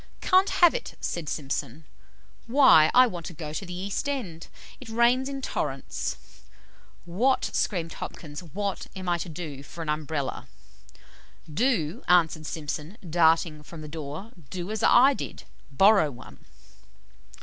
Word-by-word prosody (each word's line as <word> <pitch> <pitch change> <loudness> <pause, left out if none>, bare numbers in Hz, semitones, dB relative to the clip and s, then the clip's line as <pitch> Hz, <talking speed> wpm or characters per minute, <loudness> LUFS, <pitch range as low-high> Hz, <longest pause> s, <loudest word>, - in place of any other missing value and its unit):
'Can't 375 +1 +4
have 345 -2 +5
it,' - - -5
said 165 -4 -3
Simpson. 150 +2 -4 0.6
'Why, 230 - +7
I 255 +1 +7
want 175 -8 -5
to 175 - -9
go 150 -1 -6
to 175 - -4
the 180 - -6
East 200 +9 -2
end; 190 - -4 0.3
it 255 - -11
rains 240 +4 +3
in 275 -1 -6
torrents; 135 - -3 0.9
what' 230 +10 +1
screamed 170 -5 -1
Hopkins 150 -1 -7
'what 195 +3 -4
am 185 -1 -6
I 175 -1 +1
to 175 - -5
do 155 -4 -7
for 165 +4 -8
an 155 - -5
Umbrella?' 150 -2 -3 1.1
"'Do!' 180 - 0
answered 160 -3 +3
Simpson, 155 +5 -5
darting 160 -1 +3
from 155 +2 -11
the 155 - -8
door, 155 +7 -7 0.2
'do 180 +4 -5
as 220 - -3
I 265 +3 +6
did - - -7 0.3
BORROW 195 +2 +5
ONE.'" 120 -4 -13
170 Hz, 145 wpm, -26 LUFS, 155-225 Hz, 1.1 s, Why